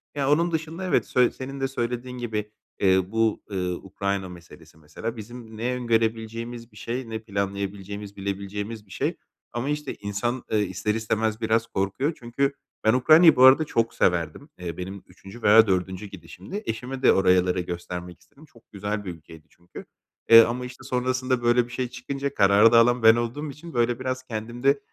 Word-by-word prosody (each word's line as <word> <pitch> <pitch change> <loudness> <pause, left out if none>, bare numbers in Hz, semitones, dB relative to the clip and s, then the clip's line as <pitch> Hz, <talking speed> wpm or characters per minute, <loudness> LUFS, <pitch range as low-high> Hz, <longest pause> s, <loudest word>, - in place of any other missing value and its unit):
Ya, 140 0 +1
onun 170 +3 +3
dışında 160 +2 -3
evet, 180 - +2
sö 125 -1 +3
senin 135 +1 -7
de 135 - 0
söylediğin 125 0 -4
gibi, 105 -3 -4 0.3
eee, 95 -1 +4
bu, 115 -1 +1
ııı, 90 -2 -2
Ukrayna 100 0 -3
meselesi 85 -2 -14
mesela 80 +10 -7
bizim 110 0 -10
ne 120 +3 -1
öngörebileceğimiz 115 0 -2
bir 105 - -17
şey 120 +1 -4
ne 110 - -4
planlayabileceğimiz, 100 -1 -4
bilebileceğimiz 100 +2 -5
bir 95 - -20
şey - - -2 0.4
ama, 120 +4 -2
işte, 150 -1 -3
insan, 120 +5 -3
eee, 110 - +2
ister 105 +1 -1
istemez 110 0 -1
biraz 115 +1 +1
korkuyor. 100 - -1
Çünkü 135 +3 -1 0.3
ben 110 - +4
Ukrayna’yı 155 +6 +7
bu 130 - +4
arada 130 +4 +8
çok 115 -5 0
severdim. 85 - 0
Eee, 85 -2 -6
benim 95 +2 -7
3’üncü 95 +5 -13
veya 110 +1 +7
4’üncü 95 +1 -1
gidişimdi. 100 - -9
Eşime 125 +4 -4
de - - +6
oralara 90 -1 +3
göstermek 90 0 -6
istedim. 145 +2 -19
Çok 115 -6 -23
güzel 105 +1 -4
bir 90 - -4
ülkeydi 80 -1 -15
çünkü, 85 0 -13 0.4
eee, 115 0 +11
ama, 120 +2 -1
işte, 125 0 -11
sonrasında 130 0 -1
böyle 120 0 +3
bir - - -14
şey 125 0 -2
çıkınca 135 +3 -5
kararı 100 +2 +5
da 115 - +7
alan 120 0 +3
ben 110 0 +8
olduğum 120 +6 -3
için 165 +4 -11
böyle 120 +1 +1
biraz 130 0 -3
kendimde 120 +4 -1
115 Hz, 175 wpm, -25 LUFS, 100-125 Hz, 0.4 s, eee